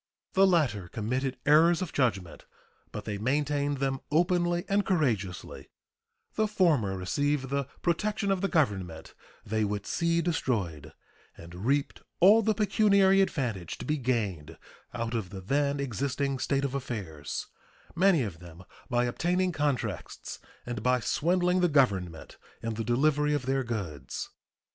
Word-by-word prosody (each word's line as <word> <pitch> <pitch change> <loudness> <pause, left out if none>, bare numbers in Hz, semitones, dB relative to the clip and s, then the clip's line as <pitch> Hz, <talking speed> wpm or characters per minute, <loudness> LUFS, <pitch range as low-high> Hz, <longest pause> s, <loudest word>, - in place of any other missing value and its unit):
The 195 +1 +5
latter 135 - +1
committed 125 +7 -2
errors 160 +3 +5
of 185 -4 -4
judgment, 100 -10 -1 0.4
but 105 - -7
they 105 -2 -4
maintained 145 +3 0
them 135 0 -1
openly 175 +2 +1
and 200 +1 +2
courageously; 115 - -2 0.6
the 215 0 +1
former 150 - +2
received 135 +9 -1
the 140 0 -1 0.2
protection 200 +4 0
of 190 -2 0
the 195 - +1
Government 95 - -1 0.3
they 110 +1 0
would 105 0 -2
see 170 0 +1
destroyed, 105 - -2 0.4
and 90 +6 -8
reaped 140 +1 0 0.2
all 205 +5 +7
the 220 0 +1
pecuniary 200 -2 +4
advantage 120 - -2
to - - -7
be 150 0 0
gained 100 - -2 0.3
out 115 0 -3
of 110 -6 -2
the 100 - -7
then 140 +8 0
existing 140 +1 -2
state 140 +1 0
of 135 - -3
affairs, 105 - -5 0.5
many 180 -4 +4
of 90 -7 -6
them 85 0 -12 0.3
by 120 -1 +2
obtaining 180 +9 0
contracts 125 - -3 0.3
and 120 -3 -4
by 125 +2 +2
swindling 180 +7 +1
the 175 -1 +3
Government 95 - 0 0.2
in 115 0 -2
the 115 +1 -3
delivery 150 +5 +2
of 135 -4 -3
their 135 0 0
goods. 90 - -5
135 Hz, 145 wpm, -28 LUFS, 105-170 Hz, 0.6 s, all